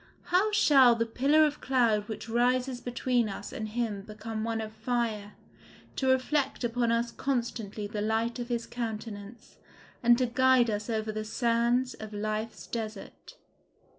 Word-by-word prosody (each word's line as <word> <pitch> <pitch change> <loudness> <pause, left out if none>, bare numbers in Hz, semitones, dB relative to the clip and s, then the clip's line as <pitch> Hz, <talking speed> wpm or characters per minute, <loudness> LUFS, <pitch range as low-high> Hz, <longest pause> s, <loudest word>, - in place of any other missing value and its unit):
How 400 +4 +4
shall 270 - +6
the 230 0 0
pillar 280 +7 +3
of 295 -1 -2
cloud 230 -6 +2
which 220 - -6
rises 245 +2 +1
between 245 -2 0
us 200 +1 -7
and 215 - -4
him 220 -3 -2
become 215 +1 -6
one 225 0 -1
of 220 -1 -5
fire, 220 -2 -2 0.6
to 265 - 0
reflect 265 +1 +1
upon 235 0 +1
us 235 0 0
constantly 230 -6 -3
the 210 0 -4
light 225 +3 0
of 240 0 -5
his 235 -1 -1
countenance, 220 -2 -7 0.4
and 240 0 +5
to 255 - +2
guide 250 -1 +4
us 210 +2 -3
over 220 -1 -1
the 215 0 -4
sands 235 +3 +1
of 215 -1 -9
life's 215 +2 -3
desert? 220 -3 -7
235 Hz, 155 wpm, -29 LUFS, 215-250 Hz, 0.6 s, shall